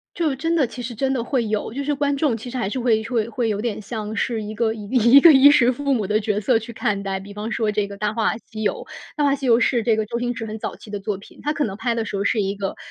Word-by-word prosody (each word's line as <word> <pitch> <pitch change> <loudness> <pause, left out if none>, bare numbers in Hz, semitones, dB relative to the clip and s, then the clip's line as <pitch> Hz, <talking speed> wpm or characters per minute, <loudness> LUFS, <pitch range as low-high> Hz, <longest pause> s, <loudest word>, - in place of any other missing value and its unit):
就 320 -4 0
真 330 +5 -1
的 320 -4 +3
其 240 +2 -9
实 240 0 -5
真 265 +4 0
的 245 -3 -1
会 250 -2 0
有， 215 0 -2
就 280 - -3
是 295 +1 -1
观 285 0 0
众 275 -5 +1
其 225 +3 -9
实 250 - -6
还 240 -6 -1
是 260 - -3
会 230 -3 +2
会 230 -1 -1
会 235 0 -1
有 205 -1 -1
点 220 -2 -3
像 215 0 -5
是 230 0 -1
一 210 +1 -6
个 220 0 +1
一 215 -2 -8
一 250 +2 +6
个 330 +2 +9
衣 275 +1 +8
食 250 -3 +4
父 280 +2 -1
母 220 -6 0
的 210 +2 +1
角 210 -1 -1
色 230 +4 +2
去 225 +1 -4
看 210 -4 -1
待， 195 -1 -2
比 195 +2 -10
方 210 +2 -5
说 220 -2 0
这 210 -1 -1
个 200 - -8
《大 210 0 -1
话 225 -1 0
西 220 -1 -9
游》， 210 - +2 0.4
《大 300 - +1
话 280 -1 +3
西 275 -1 -4
游》 235 -2 +6
是 240 -1 +2
这 225 -1 +2
个 215 -1 -1
周 235 +3 -3
星 245 0 -1
驰 225 -2 -6
很 215 0 -5
早 - - -4
期 - - -15
的 205 -1 -5
作 195 -1 -3
品， 200 - -16
他 300 - 0
可 300 -1 -1
能 195 -3 -4
拍 235 +2 -1
的 225 - -1
时 210 - -7
候 195 - -1
是 215 +2 +1
一 195 0 -1
个 195 -1 -4
230 Hz, 345 characters per minute, -22 LUFS, 210-260 Hz, 0.4 s, 个